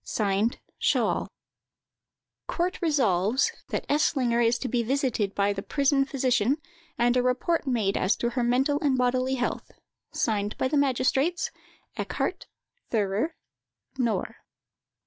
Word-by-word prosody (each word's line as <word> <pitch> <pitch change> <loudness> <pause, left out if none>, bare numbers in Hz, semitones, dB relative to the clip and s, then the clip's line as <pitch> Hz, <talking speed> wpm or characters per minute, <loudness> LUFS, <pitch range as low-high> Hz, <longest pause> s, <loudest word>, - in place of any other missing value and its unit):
Signed 210 +2 0 0.2
"SCHAHL." - - +1 1.2
"COURT 360 +2 -2
RESOLVES, 245 - +2 0.2
"That - - -2
Eslinger 260 -5 +2
is 235 +1 +3
to 255 - -4
be 245 -2 0
visited 235 -5 0
by 200 0 +2
the 195 - -4
prison 275 +3 +2
physician, 255 -2 +1 0.4
and 240 +1 +3
a 250 - +4
report 255 +6 0
made 220 -6 +1
as 190 +3 +2
to 235 - -1
her 245 - -1
mental 265 +4 +2
and 275 -3 +1
bodily 255 +1 +1
health. 245 -1 -3 0.4
"Signed 210 -2 -1
by 260 - 0
the 300 - 0
magistrates, 275 +4 +1 0.5
"ECKHARDT, - - -3 0.4
"THEURER, 215 - 0 0.6
"KNORR." 235 -3 -1
250 Hz, 125 wpm, -27 LUFS, 220-275 Hz, 1.2 s, a